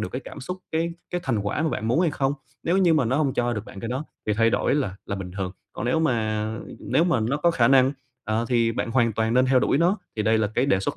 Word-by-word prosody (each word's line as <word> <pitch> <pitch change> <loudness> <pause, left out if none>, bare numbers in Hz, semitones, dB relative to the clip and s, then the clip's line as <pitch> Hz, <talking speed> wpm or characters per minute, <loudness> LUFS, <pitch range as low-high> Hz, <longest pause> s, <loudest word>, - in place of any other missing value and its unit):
được - - -2
cái 130 - -3
cảm - - -9
xúc, 180 +8 -5
cái 165 +1 0 0.2
cái 180 - -2
thành 120 -5 0
quả 105 +9 -1
mà 160 - +1
bạn 110 -7 -2
muốn 125 +8 +3
hay 175 -3 +3
không. 135 -1 0 0.3
Nếu 175 +3 +1
như 175 -4 +4
mà 150 -5 +3
nó 120 +4 +1
hông 145 -3 +1
cho 120 0 +1
được 105 -2 -4
bạn 100 - -10
cái 115 - -4
đó 130 +5 -3 0.2
thì 105 - +2
thay 115 +2 +3
đổi - - +1
là 130 -10 -1
là 100 - -3
bình 95 -2 -6
thường, 95 -2 -2 0.2
còn - - -5
nếu 130 +6 +2
mà 110 -7 0 0.3
nếu 165 - +2
mà 170 -9 +2
nó 120 +6 0
có 170 +3 +3
khả 120 -8 +3
năng, 130 0 +5 0.3
ờ, 110 +2 0
thì 115 -2 +2
bạn 115 - -2
hoàn 115 -2 +2
toàn 110 +2 0
nên 130 +1 +4
theo 130 0 +4
đuổi 135 - +2
nó. 180 +6 +3 0.2
Thì 105 - 0
đây 110 +1 +3
là 110 - +2
cái 125 - +2
đề 95 -9 +2
xuất - - -2
125 Hz, 295 wpm, -24 LUFS, 110-145 Hz, 0.3 s, năng